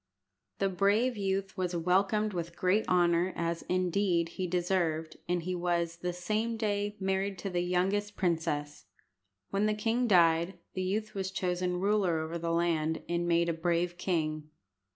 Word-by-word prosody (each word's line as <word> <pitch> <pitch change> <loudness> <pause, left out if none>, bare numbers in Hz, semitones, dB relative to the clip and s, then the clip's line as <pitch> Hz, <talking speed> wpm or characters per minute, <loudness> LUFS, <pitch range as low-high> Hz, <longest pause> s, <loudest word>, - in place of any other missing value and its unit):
The 195 - +1
brave 205 +7 +2
youth 195 -1 -2
was 180 -1 -2
welcomed 195 +5 +2
with 170 -1 -4
great 190 +4 +1
honour, 175 0 +3
as, 170 0 -2
indeed, 180 -1 +1
he 185 +2 -3
deserved, 170 -3 0
and 175 -1 0
he 185 +2 -2
was, 170 -1 -1
the 180 +1 -2
same 215 +6 -2
day, 205 -1 -1
married 195 0 -1
to 195 +1 -4
the 175 -1 0
youngest 195 +4 0
princess. 160 -5 -1 0.7
When 200 +2 +2
the 215 - +1
king 230 +3 0
died, 170 -2 +4 0.2
the 185 - -2
youth 215 +3 -2
was 190 -1 -2
chosen 180 -2 -1
ruler 195 -3 +2
over 160 +2 -3
the 165 0 -2
land, 165 -2 0
and 175 0 -1
made 170 0 +3
a 170 - +1
brave 170 +1 0
king. 155 -4 -1
180 Hz, 160 wpm, -30 LUFS, 170-195 Hz, 0.7 s, died